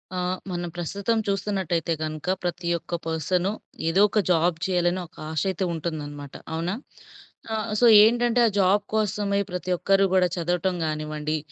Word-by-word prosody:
ఆహ్, 180 0 -1
మనం 175 -1 -3
ప్రస్తుతం 200 +6 -1
చూస్తున్నట్టైయితే 190 -5 -1
గనక 155 +1 -4 0.2
ప్రతి 175 0 -3
ఒక్క 170 - -5
పర్సను 175 +3 0 0.4
ఏదో 170 +4 +3
ఒక 215 - +1
జాబ్ 170 -1 +3
చేయాలని 180 -1 +1
ఒక - - -28
ఆశ 155 -2 -1
అయితే 190 0 -2
ఉంటుందనమాట. 145 -3 -5 0.2
అవునా? 165 +3 -1 0.8
ఆహ్, 220 0 -3
సో 245 - +5 0.2
ఏంటంటే 240 +1 +3
ఆ - - +2
జాబ్ 195 +2 +3
కోసమే 205 -1 0
ప్రతి 180 0 -3
ఒక్కరు 195 +2 +3
గూడా 185 -1 +4
చదవటం 180 +2 0
గానివ్వండి, 155 0 -2
180 Hz, 145 wpm, -25 LUFS, 165-195 Hz, 0.8 s, సో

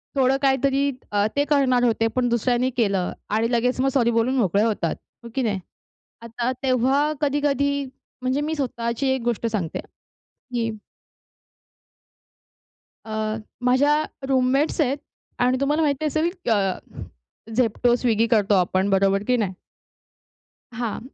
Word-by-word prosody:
थोडं 265 0 +3
काहीतरी 275 +1 +2 0.2
अ, 205 0 +2
ते 285 0 +2
करणार 265 -4 +2
होते 225 -1 +2
पण 245 -1 +1
दुसऱ्यांनी 245 +2 +1
केलं 195 -5 +1 0.2
आणि 225 +3 +1
लगेच 250 +2 +1
मग 270 - +2
सॉरी 235 -3 +3
बोलून 230 +3 +1
मोकळे 200 -2 +2
होतात. 210 -7 0 0.3
हो 235 - -9
की 265 - +1
नाही? 205 -5 0 0.6
आता 235 +2 -3
तेव्हा 265 +4 +2
कधी-कधी 280 -1 +1 0.4
म्हणजे 260 +3 0
मी 315 +2 -2
स्वतःची 235 -1 -2
एक 265 -2 0
गोष्ट 235 -1 -1
सांगते, 200 -8 -2 0.5
की. 240 -3 -4 2.4
अ, 215 0 -2 0.3
माझ्या 285 +4 +4 0.3
रूममेट्स 270 +4 +2
आहेत 275 0 +1 0.4
आणि 250 +1 +2
तुम्हाला 295 +3 +1
माहिती 295 0 0
असेल 310 +3 +1 0.2
क - - 0
अ, 195 -4 +1 0.8
Zepto, 245 0 +2
Swiggy 230 -2 +2
करतो 210 -2 +3
आपण 185 +2 +1
बरोबर 195 +1 +2
की 250 - +3
नाही? 200 -4 -1 1.2
हां. 230 -2 -3
245 Hz, 135 wpm, -23 LUFS, 220-275 Hz, 2.4 s, माझ्या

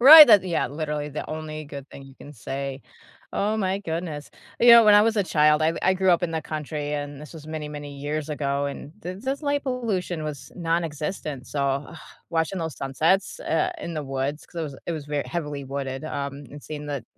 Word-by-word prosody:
right, 300 +4 +12
that 210 -5 +7
yeah 175 -2 0
literally, 150 0 -3
the 150 +1 -5
only 155 0 -5
good 140 -1 -9
thing 140 - -11
you 135 -1 -14
can 145 - -12
say. 135 +1 -5 0.5
Oh 215 +2 0
my 190 -2 +1
goodness. 160 -4 -4 0.3
You 240 0 +7
know, 235 -1 +10
when 210 - +8
I 205 - +8
was 225 0 +2
a 205 - +4
child 150 -3 +4
I 160 +1 +2
I 185 - +4
grew 190 0 +1
up 175 0 +3
in 170 - 0
the 160 - -1
country, 150 -1 -4
and 145 -1 -5
this 150 - -10
was 155 -1 -10
many, 155 -1 -5
many 145 -1 -7
years 150 +2 -3
ago, 140 -1 -1
and 140 0 -6
th 185 +2 -6
this 270 +3 -2
light 285 -1 0
pollution 200 - -2
was 150 -3 -6
nonexistent, 165 -4 -2
so, 145 - -3 0.3
ugh, 170 - -10 0.3
watching 165 +3 0
those 160 -3 -4
sunsets 160 - +1
eh 365 - +1
in 170 - -5
the 155 - -2
woods 135 +2 -3
'cause 160 -4 -5
it - - -14
it 170 - -1
was 155 -3 -5
very 145 -1 -1
heavily 150 -5 -4
wooded, 135 0 -4
um, 140 -2 -3 0.2
and 145 0 -10
seeing 150 -1 -7
the 140 -5 -4
155 Hz, 215 wpm, -25 LUFS, 145-180 Hz, 0.5 s, right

